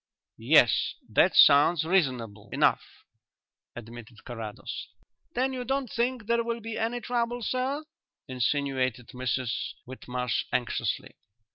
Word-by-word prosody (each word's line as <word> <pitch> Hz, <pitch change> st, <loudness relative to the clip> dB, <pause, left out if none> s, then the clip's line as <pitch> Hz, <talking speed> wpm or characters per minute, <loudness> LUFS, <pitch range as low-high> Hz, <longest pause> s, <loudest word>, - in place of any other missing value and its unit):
"Yes; -, -, +4 dB
that -, -, +3 dB
sounds 150 Hz, +3 st, +6 dB
reasonable 125 Hz, -, 0 dB
enough," -, -, +3 dB, 0.9 s
admitted 115 Hz, 0 st, -11 dB
Carrados. 115 Hz, -1 st, -7 dB, 0.5 s
"Then 260 Hz, +1 st, +1 dB
you 255 Hz, -1 st, -3 dB
don't 270 Hz, -1 st, -2 dB
think 240 Hz, 0 st, -1 dB
there 235 Hz, +1 st, +1 dB
will 235 Hz, 0 st, -3 dB
be 225 Hz, 0 st, -6 dB
any 230 Hz, +2 st, -1 dB
trouble, 240 Hz, 0 st, -2 dB
sir?" 265 Hz, +6 st, -1 dB, 0.4 s
insinuated 130 Hz, -2 st, -1 dB
Mrs 125 Hz, -1 st, -2 dB
Whitmarsh 125 Hz, -1 st, -3 dB
anxiously. 120 Hz, -2 st, -2 dB
140 Hz, 110 wpm, -28 LUFS, -, 0.9 s, sounds